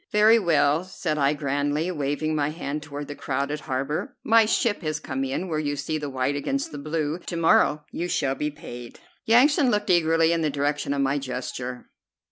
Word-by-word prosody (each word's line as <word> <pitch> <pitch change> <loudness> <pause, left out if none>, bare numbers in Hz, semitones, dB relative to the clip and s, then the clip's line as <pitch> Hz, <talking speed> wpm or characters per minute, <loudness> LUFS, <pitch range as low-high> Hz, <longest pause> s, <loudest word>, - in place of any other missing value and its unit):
"Very 215 +2 +6
well," 155 -4 +2
said 175 -4 -3
I 140 +1 +3
grandly, 145 +3 -1
waving 150 0 -1
my 145 -1 +1
hand 150 -2 -4
toward 145 -1 -7
the 145 - -5
crowded 140 +1 -2
harbor, 140 +1 -3
"my 225 0 +5
ship 225 -1 +1
has 155 -2 -2
come 135 -3 -3
in 135 +8 -2
where 155 -3 -1
you 145 -1 -1
see 155 +2 -3
the 145 -1 -4
white 130 +1 -1
against 275 - -2
the 145 - -6
blue. 155 +2 -2
To 175 - -6
morrow 150 -2 +3
you 175 - -3
shall 150 -6 0
be 150 +2 -2
paid." 125 -6 -10 0.3
Yansan 260 +4 +5
looked 210 -3 +1
eagerly 165 -1 +3
in 170 -1 +1
the 155 - +1
direction 145 0 -1
of 140 - 0
my 140 +2 +1
gesture. 125 -1 -5
150 Hz, 195 wpm, -25 LUFS, 140-170 Hz, 0.3 s, Very